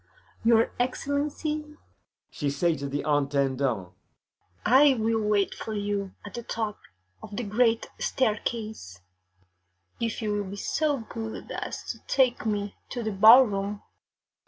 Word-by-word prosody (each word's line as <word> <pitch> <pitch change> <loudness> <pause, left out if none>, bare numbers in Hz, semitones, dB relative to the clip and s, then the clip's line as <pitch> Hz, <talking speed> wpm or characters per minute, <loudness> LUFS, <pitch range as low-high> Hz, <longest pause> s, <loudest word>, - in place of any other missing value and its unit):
Your 230 0 +4
Excellency,' 295 +4 -2 0.6
she 145 - -2
say 170 +4 +1
to 140 -1 -5
the 145 +1 -2
Intendant, 135 -8 +1 0.8
'I 270 +5 +7
will 225 -1 +1
wait 210 -2 +1
for 220 - -6
you 205 -2 -2
at 205 - -9
the 240 - -4
top 220 -2 -3 0.4
of 205 - -8
the 245 - -1
great 225 +2 +2
staircase, 215 - -2 1.0
if 230 -2 -2
you 210 - 0
will 205 -2 -2
be 200 - -6
so 290 +6 0
good 225 0 -7
as - - -5
to - - -10
take 250 -3 +2
me 205 -1 -1 0.2
to 240 -2 -4
the 220 - -1
ballroom. 205 -1 +6
215 Hz, 135 wpm, -27 LUFS, 195-240 Hz, 1.0 s, I